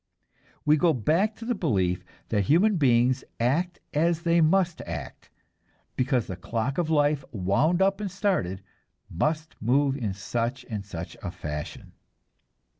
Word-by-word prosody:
We 150 +1 +5
go 165 +1 +3
back 165 - +1
to 225 - -9
the 245 - 0
belief 95 - 0 0.3
that 105 -3 +1
human 185 - +4
beings 125 -2 +3 0.2
act 155 +10 0
as 165 +2 +1
they 170 -1 +3
must 170 +1 +2
act, 80 -4 -7 0.7
because 130 -3 +1
the 95 - -5
clock 115 - -2
of 165 -3 0
life, 145 -2 +2
wound 120 - +2
up 195 +1 +1
and 205 - -2
started, 180 - -1 0.5
must 155 - -2
move 135 +5 +2
in 110 -8 -3
such 120 +5 -3
and 105 -3 -4
such 85 -4 -7
a - - -4
fashion. 75 0 -6
140 Hz, 145 wpm, -26 LUFS, 110-170 Hz, 0.7 s, We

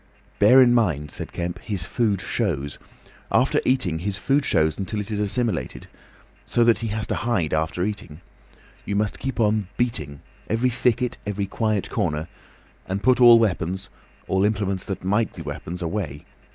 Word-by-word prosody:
"Bear 125 +6 +8
in 120 -1 +4
mind," 80 - +1
said - - -6
Kemp, 85 0 -4
"his 100 -6 -3
food 105 -1 0
shows. 85 - -2 0.5
After - - +3
eating, 90 -11 +1
his 100 +3 -3
food 140 +5 +1
shows 80 - +1
until 100 +2 -3
it 105 +1 -5
is 105 - -2
assimilated. 105 - -1 0.6
So 120 - +2
that 115 -1 +4
he 115 - -3
has 110 0 -2
to - - -2
hide 105 -10 0
after 80 +3 0
eating. 95 -7 -6 0.6
You 100 - -3
must 105 +1 -1
keep 135 -3 -4
on 105 -3 +2
beating. 75 - -2 0.3
Every 120 +3 +1
thicket, 125 0 0
every 100 -1 -1
quiet 105 0 -1
corner. 80 -6 -1 0.6
And 95 +2 -3
put 130 0 +4
all 120 -1 +9
weapons—all 95 -1 -2
implements 100 -3 0
that 95 - -5
might 105 +4 0
be - - -7
weapons, 90 +2 -6
away. 80 -5 -4
100 Hz, 165 wpm, -23 LUFS, 90-115 Hz, 0.6 s, all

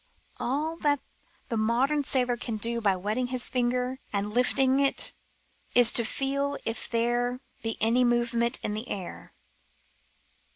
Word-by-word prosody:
All 305 +6 -1
that 290 -3 +1 0.5
the 230 - -1
modern 255 +7 +2
sailor 250 -2 +1
can 230 -2 -4
do 235 +2 -1
by 200 -3 +3
wetting 215 +7 -2
his 250 -1 0
finger 250 +1 0
an 200 -1 0
I - - -5
lifting 260 +3 +3
it 275 -1 +1 0.6
is 245 -1 +6
to 235 - +6
feel 280 +4 -1
if 225 - -3
there 240 +1 0 0.2
be 225 -1 -3
any 235 +3 +3
movement 240 0 +1
in 210 - -1
the 215 +3 -5
air. 185 -3 -7
245 Hz, 150 wpm, -27 LUFS, 230-260 Hz, 0.6 s, is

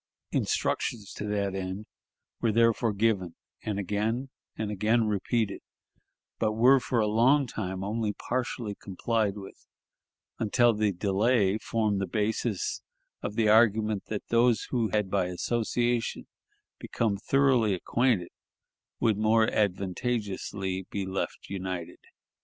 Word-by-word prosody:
Instructions 105 -4 -1
to 105 - -5
that 100 -2 -1
end 95 +2 -4 0.6
were 115 - +2
therefore 115 +1 +3
given, 100 -4 0 0.3
and 105 -2 -3
again 105 +7 -1 0.3
and 110 -1 -2
again 110 +3 +2
repeated, 105 +1 -1 0.8
but 110 -1 +1
were 125 +5 +6
for 125 -1 -1
a 110 - +3
long 125 +7 +4
time 95 -5 -4
only 105 +1 -1
partially 120 -1 -3
complied 105 +1 -1
with, 95 -1 -11 0.7
until 120 +2 +3
the 105 -1 +1
delay 100 +2 +2
formed 110 -4 0
the 95 - -1
basis 110 -1 -1 0.4
of 105 - -4
the 110 -1 +2
argument 110 -2 +4
that 105 -2 -5
those 115 -2 +3
who 115 -4 +1
had 105 -1 0
by 100 -2 +2
association 120 +5 -1 0.5
become 110 -3 -1
thoroughly 125 -3 +3
acquainted 110 -1 +1 0.7
would 110 -3 +2
more 110 +1 +4
advantageously 95 -1 -2
be 100 -1 -3
left 95 0 -4
united. 90 -3 -5
105 Hz, 125 wpm, -28 LUFS, 100-115 Hz, 0.8 s, were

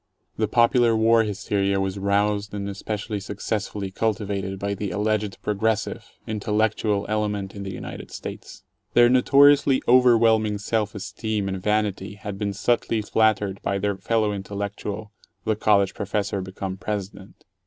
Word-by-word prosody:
The 110 - 0
popular 115 0 +4
war 115 +1 +5
hysteria 100 -2 0
was 95 0 -2
roused 100 +1 0
and 100 -1 -3
especially 105 +1 -4
successfully 105 0 -4
cultivated 100 -2 -2
by 100 +1 -2
the 100 0 -3
alleged 105 -1 -1
progressive, 105 +1 -1 0.2
"intellectual" 105 -1 0
element 105 -2 -2
in 100 - -7
the 95 -1 -5
United - - -8
States. - - -8 0.3
Their 120 0 +7
notoriously 140 +2 +5
overwhelming 115 -4 +5
self 105 +1 -1
esteem 105 0 -3
and 95 -1 -3
vanity 105 -1 -1
had 100 -1 -7
been 105 -1 -1
subtly 115 +1 0
flattered 105 -3 +1
by 100 - -1
their 100 0 -1
fellow 110 +1 0
intellectual, 100 +1 -5 0.3
the 110 - +1
college 100 -2 +3
professor 100 -1 -2
become 95 0 -5
President. 100 -1 -6
105 Hz, 135 wpm, -24 LUFS, 100-110 Hz, 0.3 s, Their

